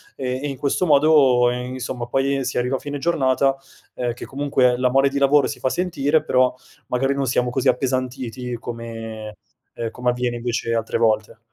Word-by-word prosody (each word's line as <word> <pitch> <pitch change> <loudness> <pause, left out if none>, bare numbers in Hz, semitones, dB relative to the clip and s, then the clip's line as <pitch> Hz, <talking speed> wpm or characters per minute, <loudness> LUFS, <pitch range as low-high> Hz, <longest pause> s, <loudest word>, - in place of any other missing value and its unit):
e 130 -1 -3
e - - -1
in 135 -2 -5
questo 140 +6 0
modo 140 -5 +5
insomma 125 0 -4
poi 135 +2 0
si 130 - -3
arriva 125 +2 0
a - - -10
fine 145 +1 -5
giornata, 135 -3 +2 0.4
ehm, 120 -1 -2
che 120 - -9
comunque 135 -3 +1
la 125 0 +2
mole 135 +2 +3
di 140 - -2
lavoro 140 +1 +4
si - - -6
fa 130 - 0
sentire, 160 -3 0
però 130 0 +2 0.3
magari 135 +2 0
non 140 -1 -1
siamo 125 0 +1
così 130 +2 -1
appesantiti 125 -1 -1
come, 115 -2 -7 0.4
ehm, 115 -1 -4
come 125 0 -1
avviene 125 -1 -1
invece 115 -1 -2
altre 115 -1 -1
volte. 110 -1 +1
130 Hz, 180 wpm, -22 LUFS, 120-135 Hz, 0.4 s, modo